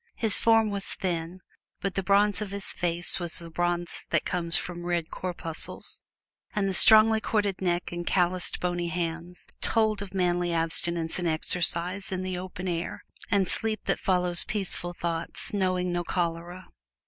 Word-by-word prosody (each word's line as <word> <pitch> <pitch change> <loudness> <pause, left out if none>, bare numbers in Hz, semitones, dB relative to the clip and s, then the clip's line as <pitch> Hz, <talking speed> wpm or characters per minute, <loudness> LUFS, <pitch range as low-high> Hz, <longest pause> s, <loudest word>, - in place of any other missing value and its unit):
His 220 -3 +5
form 225 -2 +3
was 200 -1 -2
thin, 175 -1 -4 0.4
but 195 -2 -3
the 195 - -1
bronze 200 +1 +2
of 210 - -4
his 200 0 -2
face 175 +1 +3
was 175 -2 0
the 170 -2 -5
bronze 175 +1 -2
that - - 0
comes 170 -2 +4
from 175 -1 -5
red 175 -2 -2
corpuscles, 170 -3 -4 0.5
and 200 -2 +1
the 195 - -1
strongly 220 +3 +7
corded 205 -4 -1
neck 175 -1 -1
and 175 0 -4
calloused, 180 -1 +1
bony 175 -1 -2
hands 170 +1 -4 0.2
told 215 -2 +1
of 200 -2 -7
manly 175 -1 0
abstinence 165 +1 -1
and 175 - -1
exercise 175 +4 0
in 185 0 -3
the 185 -1 -3
open 180 0 -6
air, 170 -1 -4 0.3
and 195 -2 +2
sleep 220 -2 +1
that - - 0
follows 180 -2 +2
peaceful 190 -5 -3
thoughts, 170 +2 -3
knowing 185 -2 0
no 175 0 -1
chloral. 175 +1 -3
180 Hz, 160 wpm, -27 LUFS, 175-195 Hz, 0.5 s, strongly